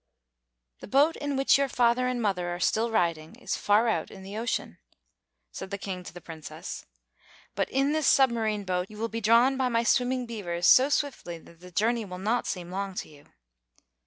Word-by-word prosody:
"The - - -10
boat 285 +8 +3
in 285 -1 -3
which 270 0 +4
your 275 -1 +1
father 245 +1 +2
and 250 -1 -1
mother 190 -6 -1
are 175 0 -4
still 220 +5 +1
riding 170 -6 -1
is - - -3
far 210 +3 +3
out 225 - 0
in 190 - -12
the 195 +2 -8
ocean," 225 - -3 0.7
said 190 - -7
the 200 - -4
King 190 -2 -6
to - - -8
the 175 - -10
Princess; 160 -2 -8 0.7
"but - - -1
in 275 +2 +1
this 310 -2 +1
submarine 225 -6 +3
boat 180 0 -2
you 215 - -12
will 230 +1 -2
be 230 +1 -4
drawn 235 +5 +4
by 260 -1 +1
my 230 -1 +1
swimming 250 +1 +1
beavers 180 -7 -3
so 260 +9 +7
swiftly 275 - -2
that 165 0 -18
the 180 +1 -12
journey 225 +5 +1
will 180 -3 -7
not 220 +6 -1
seem 180 -2 -4
long 195 0 -4
to - - -5
you." 145 -1 -17
220 Hz, 200 wpm, -27 LUFS, 180-250 Hz, 0.7 s, so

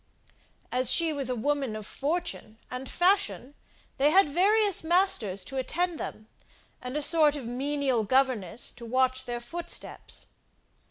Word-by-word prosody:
As 255 0 +3
she 330 -2 +1
was 275 -3 0
a 250 - -1
woman 270 -1 -1
of 215 -1 -7
fortune 295 -5 -3
and 255 +1 -6
fashion, 290 - +1 0.4
they 280 +2 +4
had 380 +3 +5
various 400 +6 +2
masters 325 - +1
to 270 - -6
attend 340 +5 -1
them, 215 - -7 0.5
and 250 +3 -4
a 300 - +1
sort 305 -2 +5
of 275 -5 -6
menial 265 0 -1
governess 245 -4 +1
to 235 - -11
watch 260 +1 +1
their 240 -1 -4
footsteps. 340 +8 -7
270 Hz, 145 wpm, -28 LUFS, 245-330 Hz, 0.5 s, had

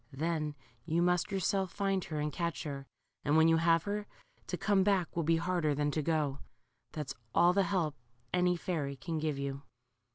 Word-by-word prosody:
Then 155 0 -1 0.3
you 170 +2 +1
must 180 +4 +2
yourself 190 -1 0
find 195 -2 0
her 155 -2 -3
and 150 0 -1
catch 170 -2 -2
her, 140 -3 -5 0.4
and 150 +2 +3
when 160 0 +6
you 165 0 +5
have 165 0 +4
her, 205 0 -3 0.4
to 180 - -2
come 195 0 +3
back 190 -4 +1
will 170 - +1
be 165 +1 +3
harder 165 -3 +1
than 145 +1 +1
to 155 - 0
go. 150 -3 0 0.5
That's 150 -3 -4 0.2
all 175 +1 +6
the 200 - +4
help 180 -5 0 0.4
.any 180 0 +3
fairy 150 -6 -2
can 160 +4 -3
give 155 -2 -1
you." 140 0 -3
165 Hz, 190 wpm, -32 LUFS, 150-180 Hz, 0.5 s, when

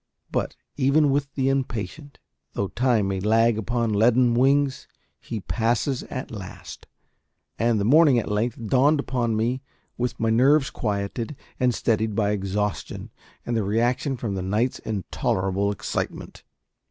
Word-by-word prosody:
But, - - -2 0.2
even 140 +1 +3
with 140 0 0
the 135 -1 +1
impatient, 135 - -3 0.4
though 100 - -2
time 120 -5 +1
may 95 -1 -1
lag 110 +2 +3
upon 115 0 -1
leaden 120 +3 +4
wings, 135 +2 +2 0.3
he 110 -3 -6
passes 120 +5 0
at 130 - -6
last; 100 -5 -9 0.7
and 115 -1 +2
the 100 - 0
morning 145 +1 +6
at 115 - -1
length 115 +2 -1
dawned 140 +6 +3
upon 120 -4 -1
me 120 +4 0 0.4
with 125 0 -2
my 115 0 +1
nerves 135 +4 +4
quieted 105 +5 -3 0.2
and 125 -1 +3
steadied 110 -2 0
by 105 -1 +1
exhaustion 105 0 -3 0.3
and 120 - -1
the 110 - +1
reaction 120 +6 0
from 115 -4 -3
the 95 - -3
night's 105 +7 0
intolerable 95 -1 -1
excitement. 100 - -4
115 Hz, 140 wpm, -24 LUFS, 105-130 Hz, 0.7 s, morning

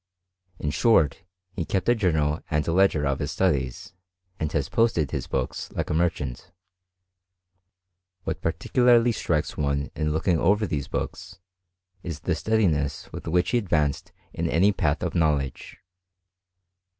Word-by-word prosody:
In 75 - -2
short, 80 - +3 0.3
he 95 -2 -3
kept 95 +3 -2
a 120 - +6
journal 80 -9 +1
and 75 -2 0
ledger 85 -3 +3
of 70 -1 0
his - - -2
studies, 65 0 -1 0.5
and 80 -2 -2
has 70 -3 0
posted 100 - +1
his - - -3
books - - -3
like - - -3
a - - +1
merchant. 80 -3 -1 1.7
What - - -4
particularly 120 +8 +3
strikes 80 -8 -1
one 70 -1 -1
in 75 -1 -1
looking 80 +2 +1
over 105 +6 +3
these 75 -7 -3
books, 95 - -5 0.6
is 80 -5 -6
the 90 - 0
steadiness 85 -8 0
with - - -7
which 90 +2 +1
he 120 - +3
advanced 75 -9 -1 0.2
in - - -2
any 95 +6 +4
path 75 -6 0
of - - -2
knowledge. 75 -5 -1
80 Hz, 140 wpm, -25 LUFS, 75-95 Hz, 1.7 s, a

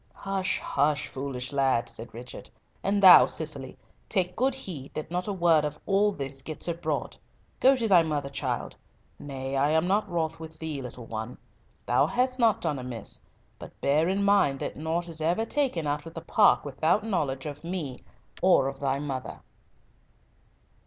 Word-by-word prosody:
"Hush, 195 -1 -1
hush! 145 +1 +1
foolish 130 -1 -5
lad," 130 -4 +2
said 115 0 -9
Richard, 120 +2 -10 0.3
"and 200 +1 +1
thou, 185 -2 +10
Cicely, 145 -4 -4 0.3
take 180 -3 0
good 260 +2 +1
heed 170 - -6
that 155 +1 -5
not 180 +2 -2
a - - -1
word 170 -5 +3
of 150 0 -3
all 205 +1 +3
this 135 -6 -6
gets 155 +3 -6
abroad. 170 0 -3 0.4
Go 270 +1 +6
to 235 -3 0
thy 185 -5 +6
mother, 150 -3 -2
child,—nay, 135 -1 -6
I 140 +2 +2
am 160 +2 +2
not 205 +2 +1
wroth 165 -2 -2
with 160 0 -10
thee, 155 -4 -4
little 125 -1 -8
one. 110 +2 -6 0.5
Thou 120 +1 +3
hast 255 +1 0
not 225 -4 +3
done 145 -3 -1
amiss, 125 -4 -7 0.4
but - - -12
bear 155 +5 +2
in 195 +1 0
mind 200 -9 +3
that - - -3
nought 165 +3 -2
is 160 -2 -5
ever 175 +8 +1
taken 245 - 0
out 145 +1 -2
of 165 - -11
the 165 - -5
park - - +4
without 160 +9 +1
knowledge 145 -10 -1
of 150 0 -7
me 165 -7 -4 0.4
or 180 -8 +4
of 135 0 -5
thy 135 -1 0
mother." 135 -4 -5
155 Hz, 175 wpm, -27 LUFS, 135-185 Hz, 0.5 s, thou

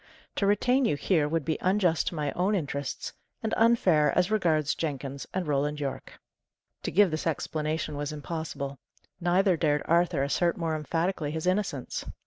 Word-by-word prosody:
To 200 - +2
retain 250 +6 +3
you 150 - +2
here 155 0 +1
would 160 0 -1
be 160 - -1
unjust 185 -3 +2
to - - -2
my 150 -2 -1
own 190 +4 +1
interests, 140 -5 -3 0.3
and 220 - -1
unfair 190 -10 +4
as 180 +3 +2
regards 160 -8 +2
Jenkins 140 -3 -4
and 185 -1 -2
Roland 150 0 0
Yorke." 140 -2 -5 0.6
To - - -3
give 200 -1 +4
this 155 +1 -2
explanation 155 0 -2
was 145 +1 -3
impossible; 150 -3 -5 0.4
neither 180 +2 +3
dared 150 -2 +1
Arthur 170 -3 +2
assert 170 +4 +1
more 165 -2 -1
emphatically 165 +1 -1
his 160 +2 -4
innocence. 185 -8 -1
160 Hz, 160 wpm, -28 LUFS, 150-180 Hz, 0.6 s, unfair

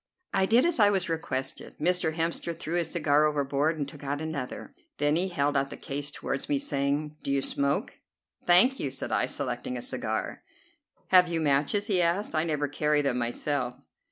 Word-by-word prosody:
I 190 0 +3
did 235 +6 +5
as 345 -6 +1
I 205 -1 +7
was 190 -3 +1
requested. 135 -5 -4
Mr. 165 0 +1
Hemster 165 0 -2
threw 160 - -5
his 175 -1 0
cigar 150 -3 +3
overboard 145 +1 +1
and 145 -2 -2
took 145 0 -11
out 145 +1 -2
another. 155 -5 -5 0.2
Then 145 +1 +2
he 180 +3 +1
held 145 -5 0
out 135 0 +1
the - - -8
case 145 +1 -3
toward 140 -1 -4
me, 145 - +2
saying: 145 +2 -1
"Do - - -5
you 140 -1 +1
smoke?" 140 0 -1 0.4
"Thank 195 +10 +5
you," 140 - -1
said 120 - -5
I, 100 -2 +2
selecting 125 -2 -3
a - - -5
cigar. 110 -4 -3 0.7
"Have 180 -1 +7
you 165 -1 -1
matches?" 150 +7 +1
he 195 -5 +2
asked, 175 +4 0
"I 155 -1 +2
never 150 -3 -1
carry 150 +1 +1
them 130 -3 0
myself." 125 +1 -2
150 Hz, 190 wpm, -28 LUFS, 140-170 Hz, 0.7 s, I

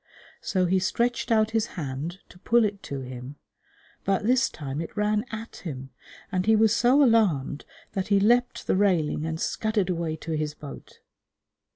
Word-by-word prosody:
So 185 -2 +1
he 185 +2 +2
stretched 235 +6 0
out 220 -1 +3
his 225 0 +1
hand 155 +4 -4
to 180 - -16
pull 235 +3 +3
it 200 -1 -3
to 140 -1 -5
him, 130 +2 -8 0.7
but 195 +1 0
this 240 0 +3
time 140 0 -5
it 165 - -8
ran 210 0 +1
at 225 +1 -7
him, 135 -6 -7 0.4
and 185 +1 -1
he 220 - +6
was 220 0 +4
so 255 +5 +5
alarmed 190 - +2 0.3
that 190 -1 -2
he 200 -1 +4
leapt 240 +4 +2
the - - +1
railing 175 -6 +1
and 160 0 -3
scudded 215 -3 0
away 165 -2 -2
to 160 +1 -7
his 155 -1 -2
boat. 145 -2 -11
190 Hz, 175 wpm, -26 LUFS, 155-220 Hz, 0.7 s, he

